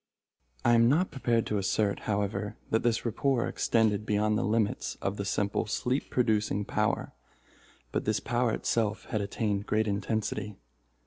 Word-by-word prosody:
I 120 - +5
am 115 0 +5
not 170 +7 +2
prepared 120 -5 +1
to 105 - 0
assert, 100 +1 +1
however, 105 0 -1
that 110 - +3
this 115 0 0
rapport 120 +2 +1
extended 110 -3 +1
beyond 105 0 +1
the 110 - +1
limits 105 -1 0
of 100 +1 -2
the 100 - -3
simple 100 0 0
sleep 125 +5 -1
producing 105 -4 +1
power, - - -1 0.8
but - - -1
this 110 -1 +1
power 120 -2 0
itself 110 -2 -1
had 110 -4 0
attained 100 0 -2
great 110 +1 +1
intensity. 105 0 -2
110 Hz, 150 wpm, -29 LUFS, 105-115 Hz, 0.8 s, I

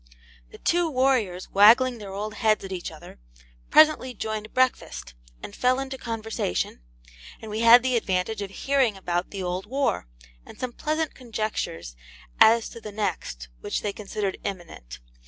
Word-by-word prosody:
The - - -13
two 345 -1 +1
warriors, 255 - +1
waggling 235 +5 +6
their 200 -2 -8
old 210 +2 -4
heads 215 -2 +1
at 190 - -8
each 180 -2 -4
other, 160 - -13 0.5
presently 305 -5 +5
joined 215 0 -4
breakfast, 255 - 0 0.3
and 200 - -8
fell 255 +1 +2
into 270 0 -4
conversation, 225 - -3 0.6
and 220 - -9
we 215 - -3
had 230 +1 +8
the 255 -1 +1
advantage 200 -1 -1
of 200 - -4
hearing 255 0 +1
about 175 -1 -2
the 195 -2 -5
old 180 +2 -3
war, 270 - -1 0.4
and - - -14
some 250 -1 -4
pleasant 310 +3 -2
conjectures 215 - -4 0.4
as 225 +1 +6
to 230 - -11
the 210 - -8
next, 60 - -4
which - - -3
they 205 - -2
considered 200 -1 -4
imminent. 170 - -7
215 Hz, 155 wpm, -25 LUFS, 190-255 Hz, 0.6 s, had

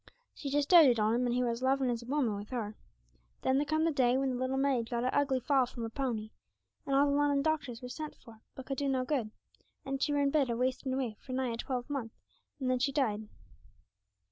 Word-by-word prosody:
She 280 - -6
just 285 0 +1
doated 295 -10 +7
on 215 +1 +2
him, 245 +1 +1
and 240 - 0
he 250 - +2
were 240 - +1
as 230 +1 -5
lovin' 265 -1 +2
as 235 -1 -3
a 235 - -12
woman 265 -5 +1
wi' 205 0 -5
her. 215 -3 -4 0.7
Then 260 0 +3
there 290 - +1
come 310 +1 +1
the 330 - +2
day 255 -3 +3
when 270 0 0
the - - -2
little 260 +1 -1
maid 265 -4 +1
got 235 -1 -1
a 255 - 0
ugly 270 -2 +2
fall 260 0 +2
from 235 -1 -7
her 225 - -4
pony, 230 -5 -3 0.6
and 275 - +1
all 280 +1 +5
the 280 - +1
Lunnon 285 -1 +2
doctors 280 -7 -1
were - - -5
sent 305 +5 -6
for, 225 -3 -16
but 265 - -8
could 270 -2 -3
do 280 -1 0
no 260 -1 0
good, 255 -6 -1 0.6
and 270 0 -3
she 295 - +1
were 290 0 +2
in 280 0 +2
bed 280 -4 +2
a 235 - -1
wasting 260 +2 -1
away 255 -5 -2
for 255 - -8
nigh 255 -1 0
a - - -4
twelve 250 0 -3
month, 270 -6 -4 0.5
and 260 - -2
then 255 0 +2
she 275 +2 +1
died. 220 -7 0
260 Hz, 255 wpm, -32 LUFS, 240-280 Hz, 0.7 s, doated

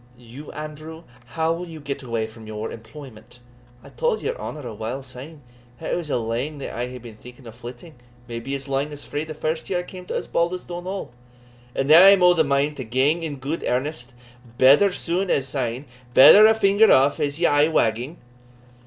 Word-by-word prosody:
"You, 125 +5 -11
Andrew? 155 +2 -8 0.2
how 160 +7 -1
will 175 +2 -6
you 160 -2 -9
get 140 -1 -5
away 115 -4 -2
from 110 0 -13
your 110 +1 -5
employment?" 115 0 -12 0.5
"I - - -13
tell'd 480 -2 -1
your 480 - -2
honour 150 - -7
a 115 - -6
while 115 +6 -5
syne, 135 +4 -10 0.4
that 160 - -4
it - - +2
was 170 -3 -5
lang 120 +4 -2
that 140 - -7
I 120 +1 -3
hae 125 0 -8
been 115 -3 -12
thinking 125 +4 -15
o' - - -8
flitting, 120 +7 -11 0.3
maybe 120 +3 -5
as 135 0 -6
lang 140 +2 -2
as 145 - -9
frae 145 +2 -4
the 155 -1 -8
first 155 +1 -3
year 185 - 0
I 175 - -2
came 180 0 -11
to - - -4
Osbaldistone 175 +1 -3
Hall; 190 -5 -5 0.6
and 135 - -1
now 160 +4 +8
I 195 - +10
am 195 -2 +5
o' 180 0 +7
the 165 -2 +3
mind 140 +1 0
to 130 - -4
gang 130 +8 +1
in 155 -3 -4
gude 140 +5 -5
earnest 125 -1 -3 0.4
better 140 +11 +6
soon 180 +2 -2
as 135 -1 +1
syne 130 -1 -3 0.3
better 205 +11 +9
a 220 - +4
finger 210 0 +4
aff 135 +2 +4
as 145 +1 -2
aye 145 0 +4
wagging." 125 0 0
145 Hz, 205 wpm, -23 LUFS, 125-165 Hz, 0.6 s, I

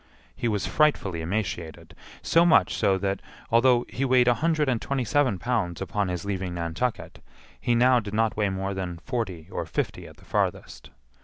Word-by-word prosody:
He 120 - -2
was 105 -3 0
frightfully 100 - +1
emaciated; 85 -2 -4 0.3
so 165 - +4
much 150 - +4
so 100 -3 +2
that, 95 0 -2 0.3
although 120 +1 +4
he 135 - -3
weighed 125 -2 +4
a 120 - +6
hundred 155 +2 +1
and 125 -4 0
twenty 135 -2 -1
seven 125 -2 +2
pounds 105 -6 -1
upon 95 +2 -1
his 90 0 -4
leaving 95 -3 -3
Nantucket, 85 +7 -3 0.4
he 120 - +1
now 125 +1 +5
did 105 -2 -6
not 110 0 +1
weigh 105 -2 +1
more 95 +1 -3
than 90 -3 -4
forty 95 - -4
or - - -4
fifty - - -3
at - - -15
the - - -19
farthest. - - -2
105 Hz, 180 wpm, -26 LUFS, 95-125 Hz, 0.4 s, a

